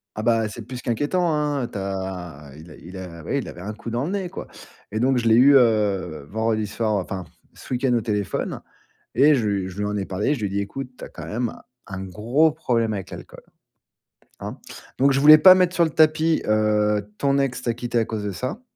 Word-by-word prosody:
Ah 110 - -4
bah 115 -1 +2
c'est 105 - -8
plus 125 -1 -7
qu'inquiétant, 150 +8 0
hein, 150 -3 0
heu. - - -4
Tu 105 - -6
as 95 -7 -6
il 80 +3 -13
a - - -12
il 90 +3 -11
a 90 -3 -8
oui 140 - -1
il 135 - -5
avait 85 - -10
un 100 +4 -5
coup 110 +2 -8
dans 120 +3 -1
le 165 - -3
nez, 195 -3 -2
quoi, 190 - -8 0.4
et 110 +1 -3
donc 130 +1 +2
je 115 -1 +1
l'ai 110 - +5
eu, 135 +4 +7
heu, 100 - +1
vendredi 110 0 0
soir, 110 +1 -2
enfin 95 -1 -3 0.3
ce - - -11
week-end 125 0 +1
au 120 - +2
téléphone 105 -3 -3 0.5
et 145 +5 +5
je 120 -6 0
lui 100 -2 -1
je 95 +1 -10
lui 105 - -1
en 105 0 -2
ai 100 -1 -3
parlé. 105 +10 0
Je 135 - -6
lui 105 - -1
ai - - -4
dit: 100 +1 -1
«Écoute, 125 +6 -6
tu - - -8
as - - -9
quand - - -10
même 120 +1 -2
un - - -14 0.3
un 95 0 -5
gros 120 - +1
problème 115 -7 0
avec 95 -2 -6
l'alcool, - - -10 1.0
hein», - - -6 0.4
donc 140 +1 +4
je 135 - +1
voulais 155 +2 +10
pas 185 +4 +9
mettre 180 -1 +2
sur 170 - +4
le 160 - -1
tapis, 155 +1 +3
heu: 105 -1 +1
«Ton 140 0 +1
ex 130 -2 -1
t'a 120 -2 -1
quitté 120 0 -2
à 115 - +2
cause 110 -2 -4
de 100 - -3
ça» 130 - -5
115 Hz, 245 wpm, -23 LUFS, 100-135 Hz, 1.0 s, voulais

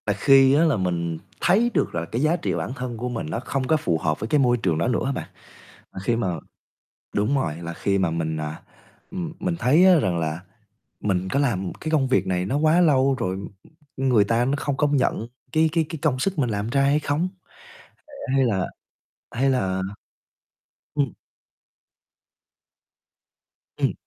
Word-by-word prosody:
Và 100 - +3
khi 135 +5 +5
á 150 +3 +4
là 155 -7 +3
mình 85 -3 -1 0.2
thấy 215 +7 +4
được - - 0
là 85 0 -1
cái 115 +9 -3
giá 155 +3 +3
trị 170 - -2
bản - - -3
thân 125 -2 -5
của 125 +2 -3
mình 115 -9 -4
nó 115 - -2
không 130 +1 -3
có 160 - +3
phù 85 - 0
hợp 80 -1 -1
với 110 - -3
cái 150 - +3
môi 125 -2 +3
trường 90 -8 0
đó 85 - 0
nữa 125 - +1
á 135 - 0
bạn, - - -5 0.6
à, - - -7
khi 115 - +1
mà 95 -8 -1 0.8
đúng 105 +7 +1
rồi, 85 - -1
là 85 0 -5
khi 100 +3 0
mà 95 -4 +1
mình, 80 -1 -2
à, 75 0 -5 0.5
ừm, 175 -3 -4
mình 180 -1 -1
thấy, 155 +8 +5
á, 185 -3 +7
rằng 90 - 0
là, 80 +1 -2 0.6
mình 95 -2 -1
có 140 - +1
làm 95 -10 0
cái 155 - -3
công 145 -4 +2
việc 100 -7 +1
này 90 -1 0
nó 130 +9 0
quá 155 +3 +4
lâu 135 -5 +4
rồi, 95 -4 -1
ừm, 100 +1 -6 0.5
ừm, 135 0 +1
người 115 -5 +5
ta 115 +3 +1
nó 135 - 0
không 140 -1 -2
công 145 -1 +2
nhận 115 -3 0 0.2
cái 160 +3 +3
cái 165 -2 +2
cái 160 - -6
công 135 -5 +1
sức 190 +3 -1
mình 125 -4 +1
làm 105 +1 -2
ra 140 +3 +2
hay 140 +2 +3
không? 155 +4 -1 0.8
Ờ, 300 - -18 0.2
hay 135 - +4
là 95 -6 0 0.6
hay 135 +3 +1
là 95 -8 0 1.1
ừm. 140 -6 0 2.6
Ừm. - - +1
125 Hz, 200 wpm, -24 LUFS, 95-145 Hz, 2.6 s, á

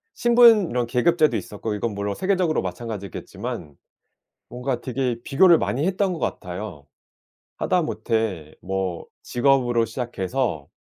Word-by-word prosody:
신분 235 -5 +6
이런 120 0 0
계급제도 155 +6 +3
있었고 105 +1 -5
이건 105 +2 -2
물론 100 0 -2
세계적으로 185 -4 +1
마찬가지겠지만 95 -7 -6 0.7
뭔가 125 +1 -3
되게 125 -1 -2
비교를 170 +4 +5
많이 140 +6 -1
했던 190 0 +1
것 - - -6
같아요. 90 -5 -5 0.7
하다못해 110 - -1
뭐 95 -2 -3 0.2
직업으로 120 -2 +2
시작해서 115 - -3
120 Hz, 305 characters per minute, -23 LUFS, 100-155 Hz, 0.7 s, 신분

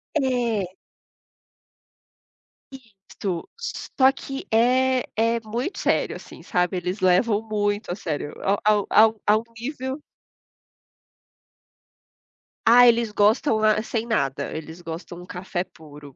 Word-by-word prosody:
É. 235 - 0 2.0
Isso, 195 -7 -7 0.5
só 265 0 +6
que 270 0 -7
é 255 +3 +3
é 230 +1 +2
muito 240 - -4
sério, - - 0
assim, - - -12
sabe, 180 +1 0
eles 180 +3 -3
levam 205 +4 +3
muito 205 -2 -2
a 175 - -2
sério, 150 -6 -4
a 195 - +2 0.3
um - - -8
a 220 - +7
um 220 0 -7
a 210 +1 +5
um 220 - -4
nível 260 +3 -5 2.6
Ah, 245 +2 +8
eles 235 -2 +3
gostam, 215 +4 +2
ah, 215 0 +4
sem 225 0 -3
nada. 140 - -1
Eles 160 +2 -8
gostam 170 +1 -8
um - - -11
café 180 0 -4
puro. 150 -5 -14
215 Hz, 125 wpm, -24 LUFS, 180-240 Hz, 2.6 s, Ah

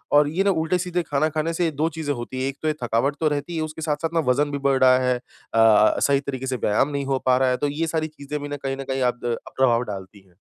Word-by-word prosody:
और 145 0 +6
ये 185 +5 0
ना 200 - +2
उल्टे-सीधे 175 +2 0
खाना 150 +1 0
खाने 155 +2 -2
से 170 -1 +1
2 155 +3 0
चीज़ें 155 -3 -3
होती 130 +2 -5
हैं, 135 - 0
एक 140 - -8
तो 155 - -2
ये 155 - +2
थकावट 120 +5 +1
तो 160 - +2
रहती 150 +3 -2
है, 160 - -1
उसके 155 0 -5
साथ-साथ 155 +1 -1
ना 165 - +2
वजन 145 +3 +1
भी 140 - -2
बढ़ 135 -1 +3
रहा 130 0 +6
है 125 - +3
अ, 115 -3 +2
सही 140 -1 +3
तरीके 135 -1 -5
से 130 - -1
व्यायाम 120 +5 +1
नहीं 140 -1 -3
हो 135 -1 0
पा 130 0 +4
रहा 130 -1 +2
है, 125 - +1
तो 145 - 0
ये 160 +3 -2
सारी 160 -1 -1
चीज़ें 150 -1 -6
भी 145 - -5
ना 145 - -4
कहीं 135 0 -4
न 135 - -5
कहीं 130 0 -1
आप 125 -1 +1
द 120 -1 -1 0.2
प्रभाव 120 -2 +3
डालती 100 -2 -8
हैं। 90 - -27
140 Hz, 285 wpm, -23 LUFS, 130-155 Hz, 0.2 s, और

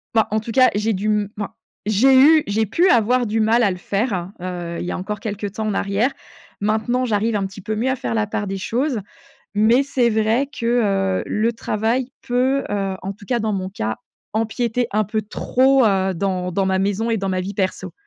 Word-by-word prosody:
Bah, 220 - +4
en 215 +1 +1
tout 225 +2 -6
cas 255 +2 +5
j'ai 215 +2 +1
dû 200 +2 -2
m 210 -1 +1
enfin, 205 +1 -4 0.3
j'ai 235 +6 +4
eu 305 +3 +7
j'ai 215 +2 0
pu 340 - +3
avoir 245 +1 +3
du 220 +1 -1
mal 225 +2 +3
à 200 - +3
le 180 - -4
faire, 195 -1 -2
heu, 175 -2 -4
il - - -4
y - - -3
a - - -3
encore 205 +3 -4
quelque 205 0 -4
temps 215 +2 -5
en 215 - 0
arrière. 200 +7 +1 0.5
Maintenant 220 +4 0
j'arrive 220 0 0
un 200 -2 0
petit 195 +1 -11
peu 215 +3 -3
mieux 235 +5 0
à 260 - +1
faire 240 - -4
la 215 -2 0
part 210 0 -2
des 195 0 -3
choses. 250 +5 -1 0.6
Mais 225 +5 +4
c'est 260 -3 +1
vrai 220 +5 +1
que, 205 -7 +1
heu, - - -4
le 225 +3 0
travail 230 +3 -1 0.2
peut, 260 +3 +1
heu, 195 -2 -1
en 195 - -3
tout 200 +1 -15
cas 240 +2 +1
dans 220 -1 -1
mon 185 -1 -2
cas, 110 - -3 0.3
empiéter 230 +2 -1
un 215 +1 +2
peu 215 +2 -1
trop, 260 +5 +2
heu, 190 -3 +2
dans 180 0 -1
dans 195 +1 +1
ma 190 0 +1
maison 205 +4 0
et 225 - +1
dans 195 0 -2
ma 185 -1 0
vie 200 +2 -5
perso. 190 -1 -2
215 Hz, 225 wpm, -21 LUFS, 195-235 Hz, 0.6 s, eu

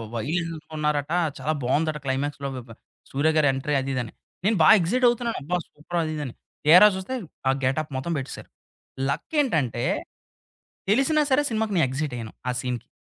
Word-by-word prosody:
Wild 165 +8 -2 0.2
ఉన్నారట, 150 -1 0 0.3
చాలా 155 - -1
బావుందట 150 +5 +1
క్లైమాక్స్‌లో 140 +1 -2
బ - - -5
బ - - -10 0.4
'సూర్య' 150 +4 +1
గారి 150 -2 +4
ఎంట్రీ 135 +2 -1
అదిదని, 130 -4 -3 0.3
నేను 215 0 +3
బా 155 - +7
ఎక్సైట్ 245 +9 +1
అవుతున్నాను 235 -1 -1
అబ్బా! 175 +6 -1
సూపర్ 165 +4 -5
అదిదని, 150 -5 -4 0.3
తిరా 180 +7 +9
జూస్తే 190 +8 -4 0.3
ఆ - - +6
గెటప్ 140 +4 0
మొత్తం 150 +6 -3
బెట్టిశారు. 135 -1 -6 0.6
లక్ 140 - -4
ఏంటంటే 140 - 0 1.1
తెలిసినా 270 +8 +3
సరే 260 +2 +5
సినిమాకి 220 -2 -1
నేను 160 - +4
ఎక్సైట్ 140 +1 -3
అయ్యాను 115 -2 -7 0.2
ఆ - - +2
సీన్‌కి. 125 -2 -4
150 Hz, 155 wpm, -25 LUFS, 135-180 Hz, 1.1 s, తిరా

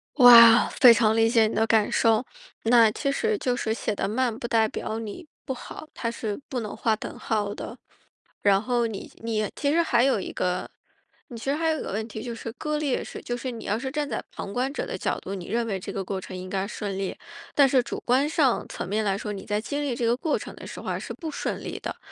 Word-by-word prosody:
哇， 235 -3 +9
非 250 -4 +7
常 220 0 +3
理 225 0 +4
解 225 -2 +4
你 - - -4
的 225 0 +2
感 220 -2 +3
受， 225 +2 +3 0.4
那 230 -1 +6
其 275 +5 -1
实 440 +8 0
就 250 -8 0
是 220 - -2
写 220 - -2
得 195 - -2
慢 235 +1 0
不 235 - -5
代 225 -1 +3
表 220 +1 -4
你 225 - -7 0.2
不 265 - -2
好， 305 +4 -9
它 230 - -3
是 225 +1 -4
不 255 - -2
能 210 - -6
画 220 -2 +1
等 - - -8
号 205 -2 -1
的。 - - -7 0.6
然 200 -1 +4
后 240 0 0
你 205 -3 -7
你 215 -2 -1
其 285 - 0
实 340 - +4
还 255 -7 +3
有 270 - +3
一 190 - -5
个 180 0 -2 0.6
你 235 - -9
其 225 - -9
实 - - +1
还 325 +1 0
有 310 - -1
一 - - -4
个 - - -5
问 220 +2 -3
题 220 0 -7
就 240 -1 -5
是 230 0 -6
割 300 +2 -3
裂 290 -4 -1
式， - - -8
就 240 - -3
是 250 +1 -4
你 230 - -8
要 205 +2 0
是 265 +2 -4
站 295 -1 -2
在 - - -3
旁 200 - -7
观 255 +2 0
者 - - -3
的 - - -5
角 - - -1
度， 195 - -6
你 180 -2 -7
认 230 +2 -1
为 195 -3 -1
这 185 - -7
个 195 - -4
过 190 0 -3
程 185 - -8
应 185 0 -7
该 195 0 -1
顺 200 -2 -5
利， 195 -1 -3 0.4
但 280 -2 +6
是 255 -1 +3
主 - - -5
观 265 +4 +3
上 280 -6 +2
层 - - -5
面 215 +3 0
来 195 -1 0
说， 210 0 -4
你 195 - -7
在 210 0 -1
经 285 +6 -3
历 275 -4 -1
这 235 0 -2
个 235 +1 +3
过 310 +3 -1
程 - - -9
的 - - -10
时 - - -8
候 - - -9
啊， - - -1
是 - - -6
不 325 -3 -6
顺 - - -3
利 - - -5
的， - - -5
230 Hz, 285 characters per minute, -25 LUFS, 210-260 Hz, 0.6 s, 哇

